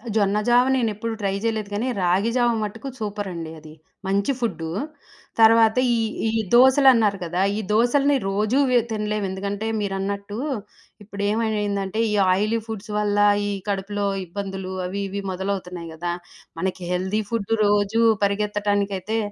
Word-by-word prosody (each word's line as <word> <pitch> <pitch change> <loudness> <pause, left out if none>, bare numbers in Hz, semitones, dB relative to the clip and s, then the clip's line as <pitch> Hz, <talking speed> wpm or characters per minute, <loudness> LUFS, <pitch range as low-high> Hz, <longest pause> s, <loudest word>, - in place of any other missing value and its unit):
జొన్న 205 -1 +2
జావ 245 +1 +5
నేనెప్పుడు 230 -2 -1
ట్రై 195 -1 0
జేయలేదు 220 -3 -1
కానీ 215 +5 -1
రాగి 185 +5 +2
జావ 240 -1 +3
మట్టుకు 225 +5 -5
సూపరండి 200 -6 -4
అది. 155 0 -13 0.3
మంచి 200 +6 +1
ఫుడ్డు 175 -9 -2 0.7
తర్వాత 225 0 +6 0.2
ఈ - - +1 0.3
ఈ - - +2 0.2
దోసలన్నారు 255 -4 +6
కదా! 175 +2 -2 0.2
ఈ - - -1
దోసల్ని 275 +6 +3
రోజు 210 +5 +1
వె 250 -1 +5
తినలేము. 210 -1 -1
ఎందుకంటే 200 +3 -3
మీరన్నట్టు 200 +1 -3 0.7
ఇప్పుడు 200 0 -7
ఏమైందంటే 210 -2 -1
ఈ - - 0 0.2
ఆయిలీ 215 +4 +1
ఫుడ్స్ 220 -1 -6
వల్ల 205 -1 0 0.3
ఈ - - -1 0.2
కడుపులో 200 +1 -2 0.2
ఇబ్బందులు 190 +1 -5
అవి 195 +3 -3
ఇవి 200 +1 -4
మొదలవుతున్నాయి 180 -2 -4
కదా! 175 +2 -3 0.5
మనకి 185 +1 -2
హెల్తీ 190 +4 0
ఫుడ్ 225 -2 -1
రోజు 205 +2 +2 0.2
పరిగెత్తటానికైతే 205 0 0
205 Hz, 135 wpm, -23 LUFS, 195-220 Hz, 0.7 s, తర్వాత